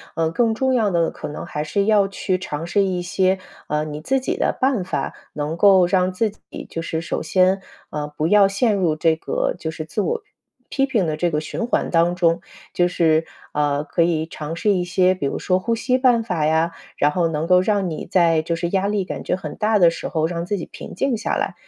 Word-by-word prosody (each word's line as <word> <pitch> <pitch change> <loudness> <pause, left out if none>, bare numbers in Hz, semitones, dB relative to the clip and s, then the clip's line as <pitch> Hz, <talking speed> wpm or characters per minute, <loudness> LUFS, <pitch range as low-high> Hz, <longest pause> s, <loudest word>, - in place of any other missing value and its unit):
呃， 165 -1 0
更 225 +2 +1
重 260 +2 +1
要 225 -4 +2
的 170 -3 +1
可 - - -7
能 150 - -6
还 150 - -4
是 200 +6 0
要 210 -2 +4
去 190 -1 -2
尝 165 -4 -5
试 200 +4 +2
一 185 -2 -1
些， 190 +1 +1 0.3
啊， 150 0 0
你 150 0 -6
自 270 +11 +1
己 260 - -2
的 - - 0
办 260 -7 +2
法， 180 - -3 0.2
能 150 +2 -3
够 190 0 +6
让 185 +1 +2
自 210 +3 0
己 - - -11
就 165 - -5
是 160 -1 -3
首 165 - -3
先， 185 +4 +2 0.3
呃， 150 -1 -3
不 155 - 0
要 200 +3 +6
陷 205 +3 +1
入 175 -5 +1
这 160 0 +2
个 160 - -1
就 160 - -3
是 160 -1 -6
自 185 +7 -2
我 460 - -1 0.5
批 270 0 +1
评 220 -9 +1
的 155 - -1
这 175 +1 +1
个 150 - 0
循 155 +10 -4
环 - - 0
当 170 +1 +3
中， 170 -2 +2 0.3
就 175 0 +3
是， 160 -2 +2 0.3
呃， 145 -1 +1
可 150 +3 -1
以 165 -2 +2
尝 160 0 -6
试 210 +4 +1
一 185 -3 +1
些， 180 +1 +3
比 165 -7 -2
如 - - -3
说 185 0 +1
呼 230 +5 -1
吸 255 +3 0
办 245 -3 +4
法 175 -8 0
呀， 160 +2 +2 0.3
然 145 +1 +3
后 175 0 +1
能 155 -1 -2
够 180 +1 +5
让 195 -2 0
你 155 - -6
在 165 -3 +3
就 165 +1 -2
是 170 +1 -2
压 195 +2 +1
力 205 -3 0
感 - - -5
觉 - - 0
很 155 -5 -7
大 215 0 +2
的 175 -4 +6
时 - - -5
候 160 -3 0
让 170 +1 -3
自 205 +1 -1
己 170 - -5
平 - - -10
静 265 +6 0
下 215 - -2
来。 - - -1
180 Hz, 255 characters per minute, -21 LUFS, 160-200 Hz, 0.5 s, 够